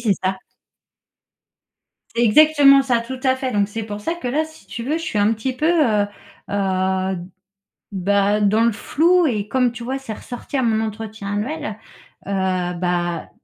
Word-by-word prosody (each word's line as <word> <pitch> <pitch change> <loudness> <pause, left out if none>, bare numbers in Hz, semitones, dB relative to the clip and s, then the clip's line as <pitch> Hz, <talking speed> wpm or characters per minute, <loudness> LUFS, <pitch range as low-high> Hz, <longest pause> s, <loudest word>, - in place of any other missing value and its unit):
c'est 215 - +2
ça. 190 0 -1 1.8
C'est 240 - +3
exactement 275 +3 +6
ça. 250 -3 +1
Tout 255 +2 -7
à 260 -1 +2
fait. 260 -1 -3
Donc 205 -1 +1
c'est 220 +1 -5
pour 210 -1 -6
ça 330 +11 -2
que, 340 -7 -7
là, 300 +6 +1
si 315 -10 -16
tu 200 +4 -6
veux, 275 +6 -1
je - - -7
suis 245 -11 -2
un 205 +2 +3
petit 230 +4 -2
peu, 255 +5 -1
heu, 230 -12 +3 0.4
heu, 190 -1 0 0.8
bah, 200 +2 +2
dans 210 +2 +3
le 235 - +3
flou 340 - +2
et 215 -8 -1
comme, 250 +1 +1
tu 240 0 -8
vois, 260 +3 -2
c'est 270 -5 -6
ressorti 245 +5 -6
à 260 - +1
mon 220 -2 +2
entretien 220 -1 -5
annuel, 235 +2 -3 0.5
heu, - - -3 0.5
bah, 175 -1 -1
225 Hz, 180 wpm, -21 LUFS, 205-265 Hz, 1.8 s, exactement